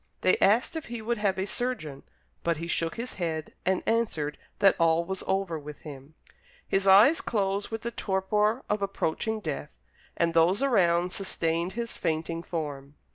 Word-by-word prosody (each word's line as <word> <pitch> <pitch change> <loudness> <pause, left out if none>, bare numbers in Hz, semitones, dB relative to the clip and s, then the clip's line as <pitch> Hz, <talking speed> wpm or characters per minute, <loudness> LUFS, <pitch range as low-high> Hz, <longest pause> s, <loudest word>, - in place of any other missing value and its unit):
They - - +4
asked 230 +10 +3
if 320 - -4
he 235 -1 -6
would 230 +1 -2
have 200 -3 +1
a 190 - -1
surgeon, 205 - -3 0.4
but 170 -1 +1
he 165 - -5
shook 165 -1 -1
his 240 +2 -5
head 160 -2 -3
and 190 -1 +1
answered 185 -11 0 0.2
that 195 - +5
all 165 0 +3
was 190 +1 -4
over 190 -4 0
with 150 0 -10
him. 145 0 -11 0.5
His 195 0 +1
eyes 210 +12 +7
closed 200 -2 -1
with 225 0 -5
the 235 - -2
torpor 210 +3 0
of 210 0 -1
approaching 200 +3 -1
death, 145 - -5 0.4
and 170 0 +1
those 175 +8 +4
around 180 -8 +3
sustained 170 -2 -1
his 235 +1 -4
fainting 165 0 -2
form. 145 -4 -5
190 Hz, 170 wpm, -28 LUFS, 165-215 Hz, 0.5 s, eyes